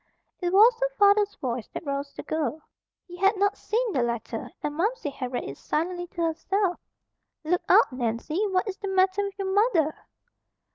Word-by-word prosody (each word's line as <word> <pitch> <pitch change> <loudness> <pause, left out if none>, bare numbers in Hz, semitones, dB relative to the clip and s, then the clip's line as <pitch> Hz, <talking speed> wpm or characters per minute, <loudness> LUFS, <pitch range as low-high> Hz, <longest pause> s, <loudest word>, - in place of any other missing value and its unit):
It 355 -2 -1
was 430 +6 +7
her - - +1
father's 410 0 +4
voice 245 -3 -4
that - - -5
roused 280 0 -4
the - - -7
girl. 315 -1 -2 0.5
He 355 -1 -11
had 390 +3 +3
not 405 +1 +2
seen 460 -1 -1
the 255 - +1
letter 235 -1 -3
and 295 - -2
Momsey 355 -1 -1
had 255 -2 -5
read 245 - -2
it 140 - -8
silently 350 +3 -2
to 340 -1 -4
herself. 355 +3 0 0.6
"Look 350 +3 +1
out, - - +6
Nancy! 255 - -2
What 380 +2 0
is 385 - -4
the 400 - -5
matter 380 +1 +2
with 400 -1 -4
your 385 -1 -2
mother?" 385 -8 +3
360 Hz, 185 wpm, -26 LUFS, 295-400 Hz, 0.6 s, was